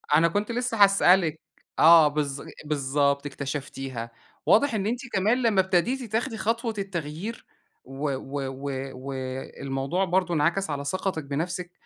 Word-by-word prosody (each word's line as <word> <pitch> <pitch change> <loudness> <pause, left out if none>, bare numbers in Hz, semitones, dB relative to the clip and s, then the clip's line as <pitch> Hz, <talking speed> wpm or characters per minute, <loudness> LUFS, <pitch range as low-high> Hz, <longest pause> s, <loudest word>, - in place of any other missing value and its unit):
أنا 165 +2 +5
كنت 205 +7 -1
لسه 235 -3 +2
هاسألك، 185 -5 +4 0.4
آه 165 -1 +8
بالظ 145 -2 -2 0.2
بالضبط 140 -1 +1
اكتشفتيها، 135 -4 -5 0.3
واضح 275 +3 +4
إن 205 -2 -1
أنتِ 240 +2 -1
كمان 215 +7 +2
لمّا 220 -5 +4
ابتديتِ 215 +7 0
تاخدي 225 +1 -1
خطوة 230 +1 -1
التغيير، 190 +2 -5 0.4
و 135 +2 -9
و 135 +2 -5
و 135 +2 -5 0.2
والموضوع 135 +4 -3
برضو 180 -1 +1
انعكس 170 +5 +1
على 140 -1 -3
ثقتِك 185 0 -2
بنفسِك، 170 +6 -3
170 Hz, 130 wpm, -26 LUFS, 140-200 Hz, 0.4 s, آه